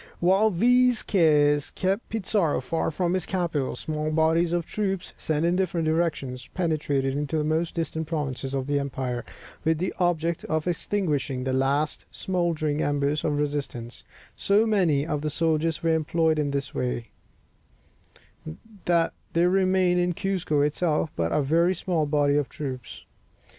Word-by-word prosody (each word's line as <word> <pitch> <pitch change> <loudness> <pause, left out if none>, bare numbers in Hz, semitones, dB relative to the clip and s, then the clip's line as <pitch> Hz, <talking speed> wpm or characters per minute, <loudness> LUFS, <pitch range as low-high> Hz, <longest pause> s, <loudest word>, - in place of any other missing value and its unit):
While 190 +5 +4
these 245 +5 +3
cares 150 -5 +3
kept 195 +4 -2
Pizarro 200 -6 0
far 160 +6 -1
from 175 +2 -1
his 185 -3 -1
capital, 170 -7 -1
small 155 0 -3
bodies 160 +2 +2
of 175 -1 0
troops, 195 -3 -3
sent 155 +1 -1
in 175 +1 +2
different 175 -3 0
directions, 155 -6 -1
penetrated 145 -6 0
into 150 +2 -1
the 150 - +1
most 160 +2 -1
distant 160 -1 -3
provinces 140 -4 -3
of 135 -1 -1
the 145 0 0
empire, 130 -3 -3 0.4
with 160 0 +2
the 185 +4 -2
object 170 -2 0
of 155 -1 -1
extinguishing 155 -8 -1
the 130 0 -1
last 140 +3 0
smouldering 165 -5 -1
embers 145 +1 0
of 150 -2 0
resistance; 140 -5 -3 0.3
so 205 +3 +3
many 175 -10 +2
of 150 -3 -2
the 155 - -1
soldiers 160 +1 0
were 165 -1 +3
employed 160 0 +1
in 145 -1 0
this 140 -1 -3
way, 125 -2 -3 1.7
that 170 -1 +2 0.2
there 175 +2 +3
remained 185 -1 +3
in 175 0 +1
Cuzco 180 -5 0
itself 150 +1 0
but 85 0 -1
a 150 - +2
very 170 +6 +2
small 170 -3 -1
body 145 -1 +2
of 145 -5 0
troops. 130 -4 -7
160 Hz, 155 wpm, -26 LUFS, 145-175 Hz, 1.7 s, While